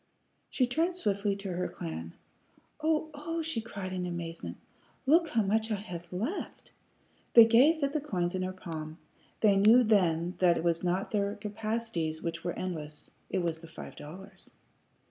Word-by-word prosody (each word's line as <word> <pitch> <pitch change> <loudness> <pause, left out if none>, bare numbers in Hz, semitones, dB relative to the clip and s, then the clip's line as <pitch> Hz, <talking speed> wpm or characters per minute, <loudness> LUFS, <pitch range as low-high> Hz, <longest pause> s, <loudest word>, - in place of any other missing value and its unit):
She 255 - +2
turned 325 +8 0
swiftly 200 - 0
to 195 -1 -5
her 180 +1 -1
clan. 80 0 -6 0.7
"O 315 0 +1
oh!" 330 +3 -3
she 310 -8 -2
cried, 195 -4 -6
in 180 -1 -2
amazement. 170 -1 -5 0.5
"Look 330 +5 +5
how 230 -6 +2
much 220 +3 +1
I 215 - +1
have 180 -4 -8
left!" 225 - -4 0.6
They 230 -1 +11
gazed 275 +8 +5
at 280 0 +1
the 305 - 0
coins 180 -10 -1
in 185 - -1
her 185 0 -1
palm. 160 -4 -7 0.4
They 205 -3 +5
knew 220 +5 +7
then 180 -5 +2
that 175 -2 +5
it - - -2
was 170 0 +1
not 180 +2 0
their 205 -1 0
capacities 210 -6 -3
which 170 0 -4
were 175 - -1
endless; 155 -5 -4 0.2
it 185 -2 0
was 165 -1 -1
the 165 - -10
five 165 - -10
dollars. 185 +7 -10
195 Hz, 170 wpm, -30 LUFS, 170-230 Hz, 0.7 s, They